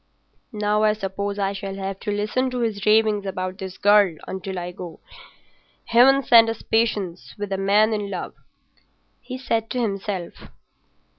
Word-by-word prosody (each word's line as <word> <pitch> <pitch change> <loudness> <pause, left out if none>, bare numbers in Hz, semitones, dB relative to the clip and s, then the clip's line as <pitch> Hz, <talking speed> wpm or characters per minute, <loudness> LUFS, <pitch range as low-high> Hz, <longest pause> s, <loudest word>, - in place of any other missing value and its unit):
"Now 210 0 0
I 215 0 +4
suppose 200 0 -4
I 195 -1 0
shall 195 0 -6
have 195 0 -5
to 210 - -3
listen 215 +6 0
to 250 -1 -3
his 215 -3 -2
ravings 215 -2 +3
about 185 0 -4
his 190 -1 -7
girl 205 -4 +4
until 190 0 -5
I 175 0 -4
go. 175 -3 -9 0.9
Heaven 270 +4 +5
send 230 -2 +6
us 225 - -5
patience 205 -6 -1
with 205 -1 -5
a 195 - 0
man 210 +3 +3
in 205 -2 -3
love!" - - -5 0.9
he 255 +1 -7
said 230 -3 -2
to 250 - -2
himself. 195 -5 -3
205 Hz, 160 wpm, -23 LUFS, 195-225 Hz, 0.9 s, send